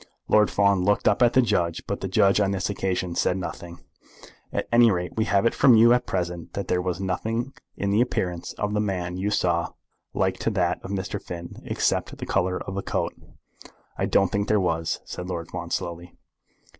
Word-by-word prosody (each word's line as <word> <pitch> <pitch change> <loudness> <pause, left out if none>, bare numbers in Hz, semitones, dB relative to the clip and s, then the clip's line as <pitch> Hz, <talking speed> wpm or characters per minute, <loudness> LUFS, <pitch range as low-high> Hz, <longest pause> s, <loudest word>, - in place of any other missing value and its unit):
Lord 105 -1 +4
Fawn 100 -2 +2
looked 105 +2 +2
up 105 +2 +3
at 120 -1 +5
the 130 - +5
judge, 90 -7 0
but - - -4
the - - -2
judge 100 +1 +3
on 100 -2 +2
this 95 -1 -1
occasion 95 -3 -2
said 90 - +1
nothing. 85 -1 -7 0.7
"At - - -2
any 120 0 +6
rate 90 -3 -2
we 110 - +1
have 100 -1 +2
it 115 - +3
from 130 -4 +6
you 115 +2 +7
at 125 - 0
present 90 -2 -3
that 100 -2 -4
there 90 - +2
was 90 0 -2
nothing 115 +7 -2 0.2
in 100 0 -1
the 105 +3 +3
appearance 90 -8 -2
of 105 0 -3
the 105 - +1
man 90 -4 -2
you 100 +3 -1
saw 85 -4 0 0.4
like 95 0 0
to - - 0
that 90 -5 0
of - - -7
Mr. 95 -2 -3
Finn 85 -1 -8
except - - -1
the - - -6
colour 90 -1 0
of 95 - -6
the 100 - -2
coat." - - -2 0.8
"I - - -1
don't 95 -2 +3
think 100 0 -1
there 105 -1 +3
was," 80 -3 -1
said 90 +1 -6
Lord 85 -2 -4
Fawn, - - -5
slowly. 85 +1 -4
95 Hz, 205 wpm, -25 LUFS, 90-105 Hz, 0.8 s, you